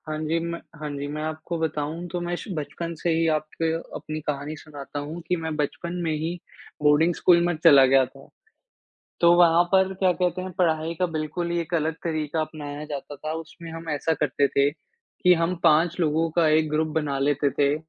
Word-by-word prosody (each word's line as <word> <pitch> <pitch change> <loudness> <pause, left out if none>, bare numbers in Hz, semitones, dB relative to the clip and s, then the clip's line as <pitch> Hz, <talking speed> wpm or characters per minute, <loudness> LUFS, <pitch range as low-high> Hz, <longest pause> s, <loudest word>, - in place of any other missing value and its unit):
हाँ 155 0 -3
जी, 155 +2 0
म 170 0 -3 0.3
हाँ 150 - -3
जी, 140 +1 -4
मैं 150 +1 -4
आपको 155 +2 -4
बताऊँ 160 +2 -2
तो 175 - -2
मैं 175 0 -2
शु 175 - -8
बचपन 165 +2 -4
से 175 - 0
ही 165 0 +2
आपको 155 +2 -3 0.3
अपनी 155 0 -6
कहानी 145 +1 -3
सुनाता 145 -1 -8
हूँ 150 +4 -6
कि 180 - +2
मैं 160 -1 -4
बचपन 155 +3 -3
में 165 - 0
ही 155 +2 -2 0.5
बोर्डिंग 150 +4 +4
स्कूल 175 -1 +5
में 175 -1 0
चला 140 -5 +8
गया 135 0 +5
था। 135 +2 -16 0.9
तो 170 0 +7
वहाँ 170 0 +6
पर 190 0 +4
क्या 190 -1 +2
कहते 180 +1 -1
हैं, 185 0 -5
पढ़ाई 165 -2 +1
का 185 - +3
बिल्कुल 165 +1 -3
ही 170 - 0
एक 170 +2 -8
अलग 160 0 0
तरीका 155 -1 -1
अपनाया 150 -2 -6
जाता 145 -1 -6
था। 155 +2 -5
उसमें 165 +1 -8
हम 165 0 -7
ऐसा 150 +2 0
करते 140 -1 +1
थे, 140 +1 +2
कि 190 - -1
हम 170 +1 0
5 165 +3 +4
लोगों 165 0 +1
का 165 -2 +5
एक 155 0 +3
ग्रुप 155 +1 +1
बना 145 -3 -1
लेते 145 +1 +2
थे, 140 +1 +1
155 Hz, 205 wpm, -25 LUFS, 150-170 Hz, 0.9 s, चला